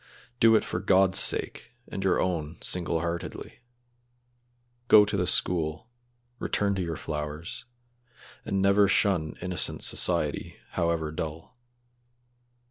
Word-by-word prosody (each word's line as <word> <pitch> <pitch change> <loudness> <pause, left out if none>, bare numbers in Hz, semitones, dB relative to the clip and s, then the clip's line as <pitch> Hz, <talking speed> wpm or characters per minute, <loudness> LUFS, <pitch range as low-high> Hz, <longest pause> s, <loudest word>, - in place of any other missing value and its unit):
Do 115 -2 +6
it 110 - +3
for 90 - -3
God's 95 -1 +3
sake - - 0
and 95 - -5
your 95 -2 +2
own 85 -3 -2
single 85 -2 -1
heartedly. 85 0 -5 1.3
Go 105 -2 +7
to 105 - -3
the 90 -2 0
school, 85 +5 +1 0.5
return 100 -1 0
to 95 - -2
your 85 -2 -3
flowers, 75 +2 -6 0.8
and 95 -1 -1
never 100 +1 +4
shun 95 -5 +1
innocent 90 -1 -2
society, - - 0 0.2
however 85 -2 -1
dull. 80 +5 -6
90 Hz, 120 wpm, -27 LUFS, 80-100 Hz, 1.3 s, Go